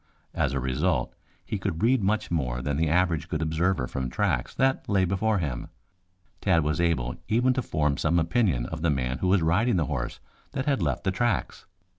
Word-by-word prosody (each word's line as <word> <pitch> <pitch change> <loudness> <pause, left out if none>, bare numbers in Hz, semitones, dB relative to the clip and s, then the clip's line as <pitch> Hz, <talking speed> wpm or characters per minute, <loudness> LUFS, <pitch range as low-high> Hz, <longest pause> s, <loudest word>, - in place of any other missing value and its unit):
As - - 0
a 70 - 0
result 65 0 0 0.3
he - - -3
could 80 +5 -3
read 125 +1 +4
much 105 0 0
more 65 -6 -1
than 70 +1 -1
the 80 0 +1
average 85 -1 +1
good 80 - -1
observer 80 -2 +1
from 65 0 -3
tracks - - -1
that 130 0 +1
lay 95 -2 +3
before 100 +4 +1
him. 70 -9 -3 0.7
Tad 85 -5 +3
was 75 +3 0
able 65 -8 0
even 125 +4 +3
to 130 - -1
form 75 - 0
some 80 +2 +1
opinion 85 - +1
of 80 +3 -6
the 85 - +2
man 65 -2 -1
who 95 - 0
was 95 -2 +3
riding 95 +9 +2
the 85 -4 +2
horse 65 -5 -3 0.3
that 135 -2 -2
had 140 -7 +1
left 75 -6 -1
the 95 - +1
tracks. 120 +5 -1
85 Hz, 200 wpm, -26 LUFS, 70-100 Hz, 0.7 s, read